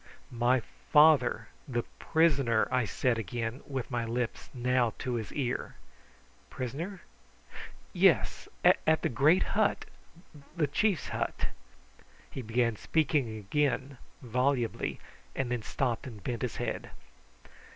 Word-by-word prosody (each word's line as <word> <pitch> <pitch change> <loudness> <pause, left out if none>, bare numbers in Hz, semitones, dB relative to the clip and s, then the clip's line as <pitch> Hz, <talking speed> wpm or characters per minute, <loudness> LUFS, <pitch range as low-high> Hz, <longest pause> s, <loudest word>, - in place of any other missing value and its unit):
"My 120 +2 +3 0.3
father 150 -7 +5 0.2
the 120 -3 -1 0.2
prisoner," 140 -9 +3
I 125 -2 +2
said 115 +3 0
again, 115 +4 -4
with 135 -2 -4
my 120 -1 0
lips 115 +1 -3
now 125 -2 +1
to 125 - -3
his 110 -3 -3
ear. 130 -3 -3 0.7
"Prisoner? 165 - -5 0.9
Yes. - - +3 0.2
At 160 0 +4
the - - +2
great 145 +9 +4
hut 210 0 +1 0.7
the 160 - +3
chief's 175 - 0
hut - - -2 0.4
" 60 - -27
He 135 - -5
began 115 -1 0
speaking 140 -7 0
again 135 +4 -1 0.2
volubly, 125 0 0 0.4
and 130 -2 -2
then 120 -2 -1
stopped 120 +2 -2
and 110 -6 -10
bent 120 -2 -3
his 125 -3 -2
head. - - -3
125 Hz, 120 wpm, -30 LUFS, 115-140 Hz, 0.9 s, father